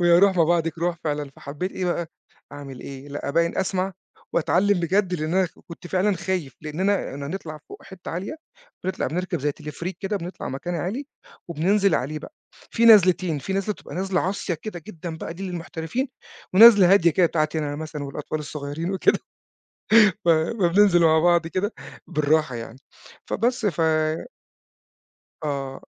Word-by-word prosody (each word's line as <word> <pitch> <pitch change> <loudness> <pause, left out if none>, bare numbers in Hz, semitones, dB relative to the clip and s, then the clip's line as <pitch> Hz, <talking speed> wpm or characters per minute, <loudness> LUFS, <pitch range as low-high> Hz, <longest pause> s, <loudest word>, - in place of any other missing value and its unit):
ويا 175 0 +6
روح 195 0 +4
ما 170 - +5
بعدك 165 -1 0
روح، 170 0 0
فعلًا. 145 -2 -2
فحبِّيت 150 +7 -5
إيه 185 - -3
بقى، 175 -1 -1 0.5
أعمل 140 -3 -9
إيه؟ 135 +1 -9
لأ، 145 0 -5
أبيّن 170 +3 +1
أسمع 190 0 -1 0.4
وأتعلَِّم 185 +3 +2
بجد، 185 +2 +1
لأن 155 0 -2
أنا 190 -1 +3 0.2
كنت 170 +1 -10
فعلًا 190 +2 +1
خايف، 175 -8 -3
لأننا 180 +4 -1
هنطلع 155 +3 -6
فوق، - - -11
حتة 190 -2 -9
عالية، 185 - -4 0.5
بنطلع 185 - -1
بنركب 180 0 -2
زَي 145 +1 0
Teleferik 160 +4 -5
كده، 205 +1 -1
بنطلع 180 0 -6
مكان 155 +7 -4
عالي، 200 - -3 0.4
وبننزل 190 +4 +2
عليه 150 +5 -1
بقى. 220 - -11 0.4
فيه 230 - +1
نزلتين، 185 -6 +6
فيه 190 +7 -4
نزلة 195 +2 0
بتبقى - - -11
نزلة 190 0 0
عصيَّة 190 -1 -2
كده 175 +1 -8
جدًا 170 -4 -7
بقى، 165 - -6
دي 185 - -8
للمحترفين، 175 - -4 0.5
ونزلة 200 -3 +9
هادية 175 -4 +5
كده، 175 +2 +3
بتاعتي 155 -1 0
أنا 145 -1 -3
مثلًا 155 -1 -5
والأطفال 145 +2 -4
الصغيرين 150 +3 -5
وكده. 190 - +3 1.1
ف - - -1
فبننزل 175 +2 +4
مع 160 -1 +5
بعض 170 0 +3
كده 190 +6 -2 0.3
بالراحة 150 -2 +1
يعني. 115 +1 -8 0.5
فبس، 240 0 0
ف 170 -5 -1 1.7
آه. 135 -2 -4
170 Hz, 155 wpm, -24 LUFS, 155-190 Hz, 1.7 s, ونزلة